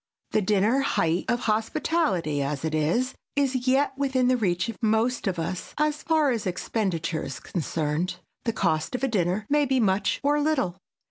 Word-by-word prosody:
The 215 - +2
dinner, 210 +6 +2
height 175 -10 +1
of 240 0 0
hospitality 220 - 0
as 140 +2 -2
it 160 - -2
is, 170 - +1 0.2
is 265 -3 0
yet 270 +1 +3
within 265 -2 +1
the 255 - +4
reach 185 -6 0
of 230 - -7
most 225 +2 +1
of 185 -2 -1
us 170 +2 -4
as 300 0 +1
far 310 -4 +2
as 230 -5 -2
expenditure 180 -3 -1
is 135 - -6
concerned. 165 +1 -2 0.3
The 230 - 0
cost 165 0 0
of 250 - -4
a - - +3
dinner 195 -2 0
may 295 0 +2
be 260 0 +2
much 195 -3 +1
or 295 +1 +2
little. 290 - +1
220 Hz, 180 wpm, -26 LUFS, 175-265 Hz, 0.3 s, the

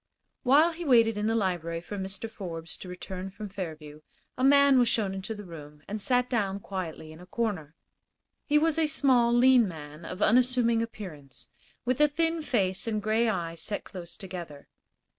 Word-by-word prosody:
While 295 +6 +5
he 340 +1 -7
waited 230 -6 +4
in 210 +1 -1
the 225 - +1
library 175 -5 -1
for 175 +5 -8
Mr. 195 +2 -4
Forbes 170 -7 -7
to - - -10
return 185 +1 -6
from 205 +2 -8
Fairview 155 -6 -7 0.3
a 255 - -3
man 280 -1 +6
was 245 - +4
shown 210 -4 +1
into 195 +3 -5
the 210 - -8
room 150 -4 -11
and 210 +1 -4
sat 250 +2 +2
down 200 -6 -1
quietly 175 -5 -6
in 155 - -12
a 180 - -13
corner. 185 -9 -3 0.7
He 300 - +4
was 325 +1 +2
a 315 - +3
small, 255 -5 +3
lean 245 -1 +5
man, 155 -2 -9
of 185 +2 -7
unassuming 245 -1 +3
appearance, 175 - -8 0.4
with 255 +3 +1
a 300 - +7
thin 325 +2 0
face 195 -9 0
and 215 -2 0
gray 220 +2 +1
eyes 170 -5 -3
set 205 - -3
close 175 -3 -9
together. 175 -7 -8
205 Hz, 180 wpm, -28 LUFS, 175-245 Hz, 0.7 s, a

